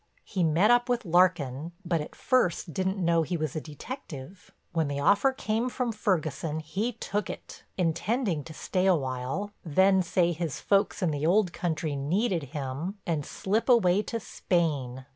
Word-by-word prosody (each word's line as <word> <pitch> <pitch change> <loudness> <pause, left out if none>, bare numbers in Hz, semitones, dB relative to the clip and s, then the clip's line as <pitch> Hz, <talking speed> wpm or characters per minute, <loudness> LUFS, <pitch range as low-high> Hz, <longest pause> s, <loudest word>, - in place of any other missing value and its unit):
He 185 -3 -1
met 170 +8 +4
up 245 +1 +3
with 245 -2 0
Larkin 170 -4 +2
but 170 -2 +1
at 150 - -8
first 180 - +1
didn't 190 +3 -1
know 170 -2 +3
he 170 +2 -1
was 155 -4 -3
a 155 - -2
detective. 160 - -9 0.2
When 165 -3 +1
the 140 0 -2
offer 200 - +4
came 230 -1 -1
from 250 -1 -1
Ferguson 160 -7 -1
he 195 +10 -2
took 210 -2 -3
it, - - -8 0.2
intending 180 - 0
to - - -9
stay 185 +3 0
a 185 - +6
while, 135 +8 -3
then 190 +4 +4
say 175 0 +2
his 165 -3 -3
folks 200 0 +1
in 170 - +2
the 150 +1 -1
old 185 0 +3
country 160 -3 -2
needed 170 +4 0
him 145 +7 -4
and 160 -4 -1
slip 210 - -1
away 205 -5 +5
to 230 +2 -4
Spain. 145 - -1
175 Hz, 170 wpm, -28 LUFS, 155-205 Hz, 0.2 s, a